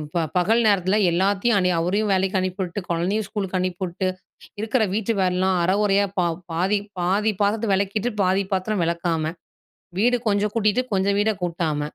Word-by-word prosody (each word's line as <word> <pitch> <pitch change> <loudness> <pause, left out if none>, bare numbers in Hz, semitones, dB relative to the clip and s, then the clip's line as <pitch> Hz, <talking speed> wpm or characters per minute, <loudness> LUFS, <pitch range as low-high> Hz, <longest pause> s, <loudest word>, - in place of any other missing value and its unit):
ப - - +2 0.2
பகல் 220 +7 +3
நேரத்தில 195 -1 +2
எல்லாத்தையும் 200 +6 +2
அனு 180 -2 +2
அவரையும் 200 +5 0
வேலைக்கு 190 +1 +1
அனுப்பிவிட்டு, 185 +1 -3
கொழந்தையும் 180 +6 0
ஸ்கூலுக்கு 195 -2 -3
அனுப்பிவிட்டு, 185 0 -2 0.5
இருக்கிற 225 +3 +1
வீட்டு 220 +1 0
வேலைலாம் 185 0 +1
அர 175 - +2
கொறையா 200 -1 +3 0.5
பாதி 185 +5 +1 0.2
பாதி 200 +5 +1
பாத்திரத்த 210 +2 0
வெளக்கிட்டு, 200 +4 -1
பாதி 190 +1 +2
பாத்திரம் 190 0 0
வெளக்காம 165 -2 -1 0.7
,வீடு 245 +3 +3
கொஞ்சம் 205 0 +1
கூட்டிட்டு 215 +2 +2
கொஞ்சம் 200 +1 +1
வீட 220 +1 +2
கூட்டாம, 165 -3 -1
195 Hz, 145 wpm, -23 LUFS, 180-210 Hz, 0.7 s, பகல்